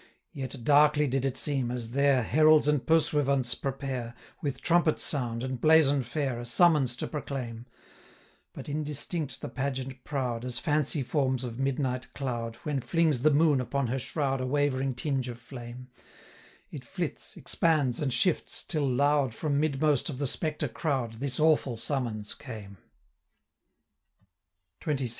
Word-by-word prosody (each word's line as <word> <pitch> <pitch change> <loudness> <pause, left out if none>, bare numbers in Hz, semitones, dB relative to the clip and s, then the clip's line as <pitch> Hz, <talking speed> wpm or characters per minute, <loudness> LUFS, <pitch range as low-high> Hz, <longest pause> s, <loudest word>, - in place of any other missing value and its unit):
Yet 130 -2 -6
darkly 150 +2 +5
did 135 0 0
it 135 -2 -1
seem, 135 -5 0
as 120 -2 -4
there 140 -1 +3
725 - - -8
Heralds 155 -1 +6
and 150 -3 +2
Pursuivants 145 -6 +2
prepare, 130 -4 -4 0.3
With 140 -4 -3
trumpet 170 -2 +2
sound, 120 -5 -1
and 130 -2 -4
blazon 155 -3 +5
fair, 130 0 -2
A 120 - -6
summons 135 -1 +4
to - - -3
proclaim; 125 -5 -5 0.8
But - - -9
indistinct 150 0 -2
the - - -4
pageant 130 0 -4
proud, 125 -5 -2
As 125 -1 -3
fancy 150 0 0
forms 130 -2 0
of 120 -1 -6
midnight 130 -2 -2
cloud, 120 -4 -3
730 - - -21
When 145 -3 -1
flings 160 -4 +1
the 155 - +5
moon 150 -2 +4
upon 140 +2 -1
her 125 +3 -1
shroud 135 -1 -1
A 130 - -2
wavering 135 -2 0
tinge 130 -1 -2
of 120 - -6
flame; 125 0 -10 0.8
It - - -7
flits, - - -4
expands, 150 -7 +1
and 145 -3 -1
shifts, 180 +6 +1
till 150 -4 0
loud, 140 -1 +2
From 145 0 0
midmost 150 -1 +1
of 140 - -5
the 140 - -1
spectre 150 +2 -1
crowd, 125 -5 -2
This 135 0 -3
awful 150 -6 +3
summons 115 -5 -2
came: 105 -7 -9 2.1
735 150 -2 0
XXVI. 130 -2 -1
135 Hz, 155 wpm, -28 LUFS, 125-150 Hz, 2.1 s, Heralds